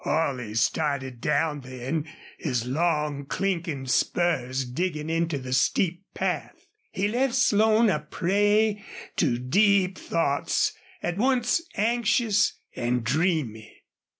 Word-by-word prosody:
Holley 130 -9 -1
started 130 +1 0
down 150 0 +1
then, 130 +5 -4 0.3
his 125 -6 -1
long, 150 0 0
clinking 170 -8 -2
spurs 130 -2 0
digging 155 +4 -3
into 165 -2 0
the 130 -1 -5
steep 175 +6 +1
path. - - -3 0.2
He 195 +2 -1
left 245 +3 0
Slone 220 -2 +4
a 170 -7 +2
prey 205 +6 +1 0.3
to 130 -8 +2
deep 190 - +2
thoughts 145 -4 0 0.3
at 175 +1 -2
once 250 +5 +2
anxious 230 0 +2 0.2
and 120 0 -1
dreamy. 130 - -1
160 Hz, 110 wpm, -26 LUFS, 130-200 Hz, 0.3 s, Slone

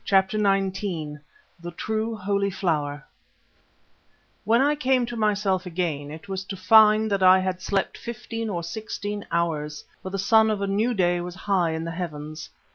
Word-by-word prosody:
CHAPTER 195 +2 +2
XIX 190 -6 -1 0.4
THE 175 0 -7
TRUE 220 +1 -2
HOLY 200 0 0
FLOWER 150 -6 -2 1.4
When 230 +2 +4
I 285 +3 +3
came 265 -4 +1
to 240 0 -6
myself 205 -4 0
again 165 -5 -2
it 160 +5 -10
was 190 -1 -4
to 195 0 -6
find 215 +1 +5
that 200 -1 +1
I 185 0 +7
had 185 -1 -2
slept 195 0 -1
fifteen 230 -1 -5
or 175 -4 -3
sixteen 205 0 -5
hours, 150 -3 -2 0.2
for 190 - -6
the 195 - -3
sun 220 +3 +4
of 215 -2 0
a 200 - -1
new 215 +5 0
day 175 -2 +2
was 175 0 -6
high 185 -4 0
in 160 0 -3
the 165 - -4
heavens. 155 -3 -6
195 Hz, 170 wpm, -25 LUFS, 170-215 Hz, 1.4 s, I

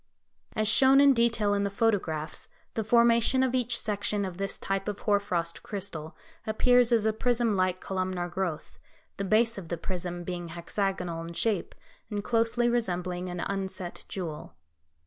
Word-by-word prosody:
As 215 0 +1
shown 265 +5 +6
in 280 -1 +7
detail 230 -4 +2
in 200 0 +1
the 200 - 0
photographs, 185 -8 -1 0.3
the 220 - -1
formation 235 +3 +4
of 260 -1 0
each 245 -2 +1
section 205 -1 -1
of 185 -1 -7
this 195 0 -2
type 195 +1 -2
of 210 -1 -4
hoar 205 -1 +3
frost 170 -4 -3
crystal 175 -6 -6 0.3
appears 245 +2 +4
as 225 -2 +3
a 220 - +2
prism 235 -1 +1
like 185 -1 +1
columnar 185 -2 -2
growth, 175 -3 -4 0.4
the 200 - -2
base 220 +2 +2
of 175 - -10
the 170 - -3
prism 175 0 -4
being 175 -1 -5
hexagonal 175 0 -3
in 170 +1 -7
shape, 205 0 -1 0.3
and 205 -2 -3
closely 230 +1 +1
resembling 180 -6 -1
an 175 -1 -4
unset 190 -2 -4
jewel. 165 -6 -6
200 Hz, 165 wpm, -28 LUFS, 180-230 Hz, 0.4 s, in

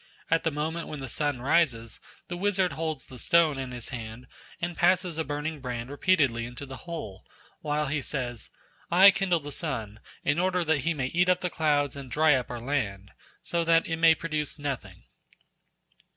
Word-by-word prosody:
At 165 +1 +3
the 165 - +2
moment 160 +3 -3
when 150 - -6
the 135 - -5
sun 140 0 -1
rises, 130 -7 +1 0.3
the 175 - -4
wizard 190 -1 +1
holds 155 -2 -3
the 125 - -11
stone 160 -2 +3
in 130 -1 -4
his 125 -2 -7
hand 115 -1 -7 0.3
and 170 0 -3
passes 180 0 +2
a 160 - -1
burning 150 +1 -3
brand 125 -1 -5
repeatedly 145 -7 +2
into 125 +3 -7
the 135 -1 -8
hole, 105 - -6 0.4
while 150 0 0
he 150 0 -1
says: 120 -5 -4 0.4
"I 190 +3 +8
kindle 185 -4 +1
the 145 0 -7
sun, 115 -9 -3 0.2
in 145 +3 +1
order 180 0 +1
that 160 -2 +2
he 165 +4 0
may 135 -3 -1
eat 175 +7 +2
up 180 0 +3
the 180 - -2
clouds 145 -3 +1
and 140 -2 -8
dry 155 +3 +4
up 130 -2 0
our 120 - -5
land, 110 -7 -2 0.3
so 170 -1 0
that 165 0 +4
it 165 - -2
may 165 0 +6
produce 155 -3 -3
nothing." 130 -11 -5
150 Hz, 190 wpm, -28 LUFS, 130-165 Hz, 0.4 s, I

